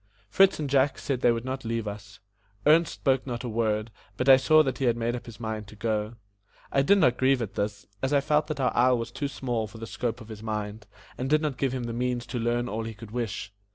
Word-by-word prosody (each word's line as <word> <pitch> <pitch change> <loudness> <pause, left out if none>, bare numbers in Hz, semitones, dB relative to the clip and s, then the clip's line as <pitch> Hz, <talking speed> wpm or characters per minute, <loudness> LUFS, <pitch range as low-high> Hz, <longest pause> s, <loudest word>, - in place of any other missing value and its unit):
Fritz 195 - +5
and 150 - -2
Jack 135 0 +2
said 130 -3 -2
they 120 - +5
would 115 +1 -2
not 130 +1 -4
leave 115 -1 -2
us; 105 0 -8 0.5
Ernest 165 +3 +5
spoke 135 -1 0
not 120 -1 -4
a - - -3
word, 110 -1 -1 0.3
but 125 - -1
I 135 - +10
saw 155 +4 +5
that 130 -4 -3
he 135 - 0
had 120 -1 +2
made 120 +1 -1
up 120 - -8
his 115 -2 -10
mind 110 -2 -4
to 105 - -12
go. 110 +1 -2 0.6
I 135 - +3
did 200 +9 +5
not 125 -10 +3
grieve 130 0 +3
at 110 -5 -4
this, 100 0 -3 0.2
as 130 - 0
I 145 - +4
felt 150 +2 +1
that 150 -2 -4
our 130 -2 +1
isle 125 +1 +4
was 115 - -4
too 145 - -3
small 120 -5 -2
for 110 +2 -12
the 115 - -6
scope 120 +1 -3
of 115 -2 -12
his 110 -1 -8
mind, 105 -1 -4 0.3
and 130 +1 -2
did 155 +1 +3
not 150 -4 -1
give 135 -2 +1
him 130 -1 -3
the 120 -1 -4
means 120 0 -1
to 120 0 -4
learn 120 +1 0
all 115 -1 -3
he 115 -1 -6
could 105 0 -11
wish. 110 -3 -4
120 Hz, 260 wpm, -27 LUFS, 110-135 Hz, 0.6 s, I